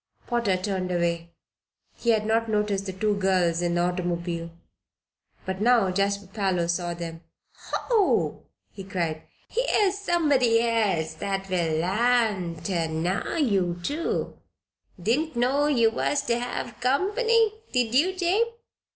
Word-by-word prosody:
Potter 235 -6 +1
turned 185 -1 -2
away. 170 -1 -1 0.6
He 235 - -3
had 220 -2 +3
not 225 +1 +1
noticed 210 -2 0
the - - -2
two 205 +2 0
girls 180 -3 +2
in 175 0 0
the 175 - +2
automobile. 175 -1 -2 1.0
But 190 +1 -4
now 230 -4 +4
Jasper 200 +1 0
Parloe 190 -3 -1
saw 175 0 -1
them. 165 -1 -7 0.5
"Ho!" 445 -6 +1 0.2
he 195 - -9
cried, 170 -5 -2 0.3
"here's 420 -5 +1
somebody 290 - +3
else 210 -9 +1
that 195 +3 -3
will 170 -3 +1
l'arn 205 -2 +1
ter 170 -5 0
know 165 - -2
ye, 200 - +1
too. 300 - -2 0.6
Didn't 260 - 0
know 265 +5 +2
you 235 -6 +3
was 280 +5 0
ter 235 -3 +1
hev 245 0 -5
comp'ny; 425 - +2 0.2
did 245 -3 +1
ye, 345 +9 +3
Jabe? 380 +6 +1
205 Hz, 135 wpm, -26 LUFS, 175-250 Hz, 1.0 s, now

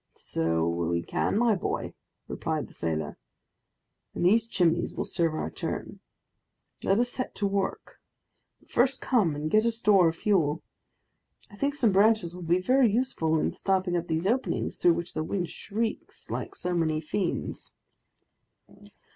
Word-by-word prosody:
"So 80 0 -1
we 85 0 0
can, - - 0
my 235 -1 +4
boy," 185 - -3 0.3
replied - - -2
the - - -17
sailor, 80 -2 -3 1.0
"and - - 0
these 220 +5 +4
Chimneys 175 -5 +1
will - - -2
serve 165 -2 0
our - - -3
turn. - - -5 0.8
Let 195 - +3
us 245 +1 +1
set 255 - -4
to 205 - -1
work, 195 -1 -2 0.6
but - - -27
first 250 +2 +2
come 205 - +2
and 150 +2 -3
get 215 0 +5
a 235 - +3
store 210 -6 +4
of 160 - -5
fuel. 165 -6 +1 0.9
I - - -12
think 280 +7 -1
some 235 -7 +3
branches 200 -3 +3
will 180 - -9
be 175 +2 +2
very 250 +4 +4
useful 200 -10 +1
in - - 0
stopping 190 -2 0
up 175 0 -1
these 160 +2 -1
openings, 245 +6 -1
through 350 -1 +5
which 170 - -5
the 155 - -2
wind 175 +1 -2
shrieks 220 +2 -4
like - - -4
so 180 0 -3
many 160 -3 +1
fiends." 170 +4 -3
185 Hz, 160 wpm, -28 LUFS, 160-225 Hz, 1.0 s, get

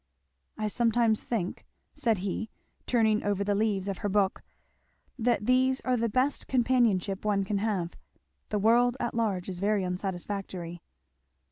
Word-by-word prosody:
"I 215 - -1
sometimes 230 0 +2
think," 200 -7 -3 0.3
said 225 -3 +1
he 215 +3 -3 0.4
turning 220 -3 +3
over 205 -1 0
the 205 0 +1
leaves 200 -2 0
of 195 -2 -3
her 205 - -1
book, 195 -1 +1 0.8
"that 235 -2 +1
these 260 +1 +3
are 255 - +1
the 230 -1 0
best 255 +6 0
companionship 230 -7 +2
one 205 -2 +1
can 200 +1 -1
have 195 -5 -1 0.5
the 210 - 0
world 240 +4 +4
at 240 - -2
large 205 -6 -1
is 185 -2 -5
very 205 0 +1
unsatisfactory." 180 -1 -4
210 Hz, 145 wpm, -29 LUFS, 195-235 Hz, 0.8 s, world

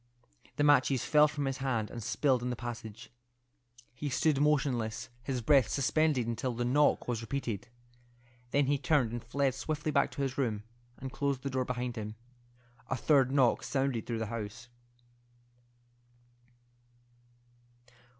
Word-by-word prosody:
The 145 - +1
matches 140 -3 +4
fell 150 0 +6
from 145 -1 -3
his 135 -1 -2
hand 120 -5 -1
and 120 - -6
spilled 130 +3 +1
in 125 - -2
the 125 - -2
passage. 115 -2 -7 0.8
He 145 +4 -4
stood 140 +2 +2
motionless, 125 -7 +1
his 125 0 -3
breath 135 0 +5
suspended 140 -1 +2
until 120 +2 -2
the 120 +1 -1
knock 145 +4 +3
was 120 -2 -1
repeated. 120 -2 -4 0.8
Then 140 +2 +2
he 140 +1 +1
turned 140 -6 +2
and 120 -1 -5
fled 135 +3 0
swiftly 150 +3 -3
back - - +3
to 140 - -2
his 135 0 -3
room, 110 -6 -1 0.3
and 130 0 -6
closed 140 -3 -1
the 140 - -3
door 130 -1 0
behind 125 -1 -3
him. 110 0 -5 0.7
A - - 0
third 135 0 +3
knock 135 -4 +3
sounded 135 -4 -1
through 115 - -2
the 110 - -2
house. 115 +2 -6
130 Hz, 150 wpm, -31 LUFS, 120-140 Hz, 0.8 s, fell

